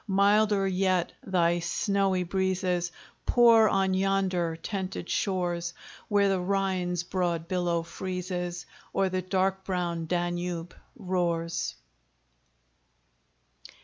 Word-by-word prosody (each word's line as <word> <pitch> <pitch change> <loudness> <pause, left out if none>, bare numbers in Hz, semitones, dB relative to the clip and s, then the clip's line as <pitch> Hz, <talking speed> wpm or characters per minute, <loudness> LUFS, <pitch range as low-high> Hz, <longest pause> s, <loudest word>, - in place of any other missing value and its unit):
Milder 200 0 +3
yet 185 -2 +1
thy 175 -2 +2
snowy 195 +1 +1
breezes 185 -1 0 0.4
Pour 230 -3 +6
on 190 -1 +2
yonder 185 -3 +1
tented 185 +1 -4
shores, 175 -3 -1 0.3
Where 205 -1 +3
the 195 -1 +1
Rhine's 180 -2 0
broad 175 -2 -1
billow 175 -2 0
freezes, 180 0 -4 0.3
Or 195 -1 +2
the 185 0 -1
dark 190 +1 0
brown 175 -3 -2
Danube 175 0 -2 0.2
roars. 175 -4 -1
185 Hz, 95 wpm, -28 LUFS, 175-195 Hz, 0.4 s, Pour